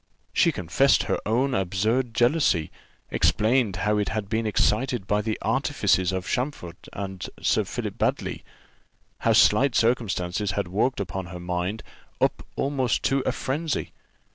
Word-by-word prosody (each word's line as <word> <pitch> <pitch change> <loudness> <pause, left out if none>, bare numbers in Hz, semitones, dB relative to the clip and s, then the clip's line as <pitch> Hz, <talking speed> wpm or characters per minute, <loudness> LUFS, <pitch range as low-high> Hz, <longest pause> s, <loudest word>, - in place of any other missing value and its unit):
She - - +4
confessed 90 +11 +2
her - - -1
own 130 +5 +1
absurd 110 +5 0
jealousy, 120 - +2 0.4
explained 110 -2 +2
how 105 0 +2
it 105 - 0
had 110 -3 -3
been 110 +1 0
excited 110 +1 +1
by 105 +1 +1
the 110 0 -2
artifices 95 -1 +1
of 95 -1 -3
Champfort 125 - -4
and 95 -2 -6 0.2
Sir - - +1
Philip - - -5
Baddely, - - -1 0.8
how - - +2
slight 125 +5 +4
circumstances 105 -5 0
had 100 -2 -1
worked 110 +7 0
her 90 0 -6
mind 90 +4 -3 0.4
up - - +1
almost 135 -5 0
to 135 0 +2
frenzy. 145 +4 -2
105 Hz, 135 wpm, -25 LUFS, 95-125 Hz, 0.8 s, She